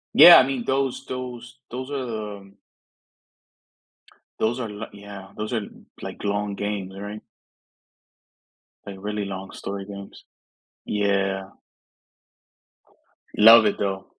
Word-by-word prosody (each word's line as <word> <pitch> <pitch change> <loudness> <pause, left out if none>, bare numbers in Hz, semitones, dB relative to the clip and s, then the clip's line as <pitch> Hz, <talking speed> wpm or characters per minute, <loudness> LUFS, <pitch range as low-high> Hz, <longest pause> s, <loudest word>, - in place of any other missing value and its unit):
Yeah, 175 - +11
I - - +7
mean, 130 -2 -2
those 135 0 -1
those 125 -1 -7
those 130 +2 -5
are, 110 -7 -4
um 100 0 -17 1.8
Those 120 +3 0
are 115 - -3
lik 105 +1 -7
yeah, 100 -1 -11
those 110 +3 -4
are, 110 - 0 0.4
like, - - -8
long 100 0 -1
games, 100 -2 -4
right? 105 +1 -7 1.6
Like, 100 -1 -7
really 105 +1 -3
long 95 0 -6
story 100 0 -6
games. 100 -1 -10 0.6
Yeah. 100 -2 0 1.9
Love 115 +1 +9
it, 105 - +1
though. 95 -1 -2
105 Hz, 115 wpm, -24 LUFS, 100-120 Hz, 1.9 s, Yeah